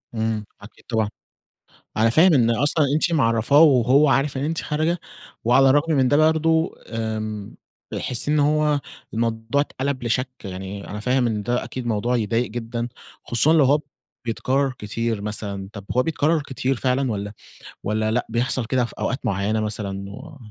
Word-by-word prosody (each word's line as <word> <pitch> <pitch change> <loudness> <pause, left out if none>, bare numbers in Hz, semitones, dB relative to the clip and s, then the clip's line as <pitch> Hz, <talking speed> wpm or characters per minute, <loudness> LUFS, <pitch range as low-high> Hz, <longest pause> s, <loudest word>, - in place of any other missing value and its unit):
إمم، 110 -1 -1 0.2
أكيد 100 - -15
طبعًا. 110 -3 +1 0.9
أنا 115 +1 +4
فاهم 165 +7 +5
إن 120 -4 +4
أصلًا 145 +6 +2
أنتِ 165 +2 +1
معرّفاه 125 +1 +4
وهو 135 0 +5
عارف 135 0 +1
إن 135 - -2
أنتِ 160 +2 -1
خارجة، 160 +3 -1 0.4
وعلى 135 +3 +5
الرغم 145 +4 +3
من 130 -3 +3
ده 145 - +3
برضه 160 +1 +3 0.2
آمم، 110 -2 -4 0.4
بيحس 125 +3 -1
إن 150 0 +3
هو 150 0 +2 0.3
الموضوع 115 +4 0
اتقلب 135 -2 -3
لشَك، 125 +3 0
يعني 95 +1 -6
أنا 105 - -5
فاهم 125 +2 +1
إن 105 -2 -2
ده 120 +2 0
أكيد 130 -2 -6
موضوع 120 +2 0
يضايق 115 +1 0
جدًا، 120 +1 -4 0.4
خصوصًا 140 +7 +2
لو 160 -3 +5
هو 145 +3 +4 0.5
بيتكرّر 130 +4 0
كتير 110 +1 -2
مثلًا. 100 -2 -4
طب 100 -2 -9
هو 125 - +5
بيتكرّر 160 +1 +1
كتير 135 -1 -2
فعلًا 130 0 0
والّا 100 0 -4 0.5
والّا 110 +1 0
لأ، 125 +2 0
بيحصل 120 +1 0
كده 125 +1 +1
في - - -10
أوقات 130 - -1
معيّنة 105 0 0
مثلًا 100 -2 -4
و 145 +9 -10
120 Hz, 165 wpm, -22 LUFS, 110-145 Hz, 0.9 s, فاهم